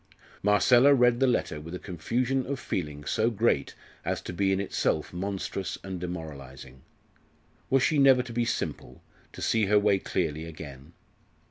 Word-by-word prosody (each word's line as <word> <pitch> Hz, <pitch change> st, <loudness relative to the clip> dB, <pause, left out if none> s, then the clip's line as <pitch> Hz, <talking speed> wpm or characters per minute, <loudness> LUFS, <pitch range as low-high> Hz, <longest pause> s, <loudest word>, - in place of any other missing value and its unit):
Marcella 120 Hz, +7 st, +5 dB
read 120 Hz, -2 st, +4 dB
the 135 Hz, -, +4 dB
letter 75 Hz, -11 st, 0 dB
with 85 Hz, +3 st, -7 dB
a -, -, -3 dB
confusion 125 Hz, -, -2 dB
of 140 Hz, -1 st, -3 dB
feeling 75 Hz, -1 st, -4 dB
so 110 Hz, +7 st, +1 dB
great 110 Hz, -, 0 dB, 0.3 s
as -, -, -1 dB
to -, -, -7 dB
be 95 Hz, +2 st, +1 dB
in 95 Hz, -, +1 dB
itself 90 Hz, -5 st, -1 dB
monstrous 95 Hz, 0 st, -4 dB
and 95 Hz, -2 st, -5 dB
demoralising. 70 Hz, -7 st, -8 dB, 0.9 s
Was 135 Hz, -1 st, +3 dB
she 155 Hz, -, +2 dB
never 135 Hz, -2 st, +6 dB
to 120 Hz, -1 st, -9 dB
be 120 Hz, +1 st, +1 dB
simple, 85 Hz, -, -4 dB, 0.3 s
to -, -, -8 dB
see 110 Hz, -3 st, +2 dB
her 105 Hz, +1 st, +4 dB
way 105 Hz, -1 st, +3 dB
clearly 80 Hz, -4 st, -2 dB
again? 75 Hz, -2 st, -10 dB
95 Hz, 160 wpm, -28 LUFS, 80-120 Hz, 0.9 s, never